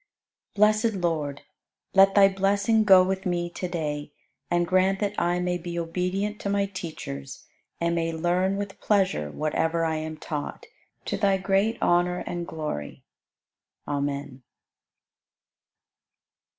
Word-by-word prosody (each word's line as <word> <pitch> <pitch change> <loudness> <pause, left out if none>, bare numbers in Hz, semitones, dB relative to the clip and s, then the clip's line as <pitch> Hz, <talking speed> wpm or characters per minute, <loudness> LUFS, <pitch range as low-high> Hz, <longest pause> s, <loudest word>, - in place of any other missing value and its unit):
87. 205 - -11
Blessed 215 +2 +4
Lord, 150 -4 -1 0.5
let 195 0 +6
Thy 200 -1 +8
blessing 200 +3 +2
go 190 -2 +8
with 190 +1 -2
me 175 -1 -1
to 180 - -4
day 150 -4 -3 0.4
and 175 0 +2
grant 185 +2 +2
that 205 -1 -1
I 175 +1 +1
may 180 0 -1
be 170 0 -6
obedient 180 +5 -2
to 200 - -2
my 200 0 +1
teachers 160 - -7 0.3
and 170 0 +1
may 165 -1 0
learn 175 +4 0
with 200 -1 -6
pleasure 190 - +1
whatever 160 - 0
I 160 -1 0
am 155 0 -5
taught, 150 -2 -5 0.4
to - - -2
Thy 195 -2 +2
great 195 +4 +1
honor 175 +1 +2
and 175 -1 -4
glory. 150 - -5 0.8
Amen. 140 -2 -3
175 Hz, 135 wpm, -26 LUFS, 160-195 Hz, 0.8 s, Thy